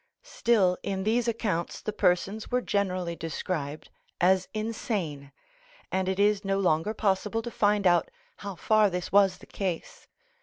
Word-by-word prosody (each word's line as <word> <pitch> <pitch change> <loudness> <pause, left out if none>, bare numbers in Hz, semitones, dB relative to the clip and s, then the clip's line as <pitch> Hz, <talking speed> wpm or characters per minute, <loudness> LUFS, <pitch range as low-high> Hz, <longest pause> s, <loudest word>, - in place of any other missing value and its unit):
Still 210 - +2
in 190 -1 -3
these 230 +3 +1
accounts 210 -7 -1
the 215 - -4
persons 195 +3 0
were 250 - +2
generally 185 -4 -1
described 155 -1 -4 0.3
as 185 +1 +3
insane, 205 - -3 0.6
and 190 0 0
it 190 +1 -2
is 205 0 +3
no 195 0 0
longer 180 +2 +1
possible 210 +3 0
to 240 - -5
find 205 -2 +2
out 175 -2 +4 0.3
how 200 -2 -6
far 215 +3 +3
this 180 -1 -4
was 195 -2 +4
the - - -15
case. 185 -4 -5
195 Hz, 150 wpm, -28 LUFS, 180-215 Hz, 0.6 s, out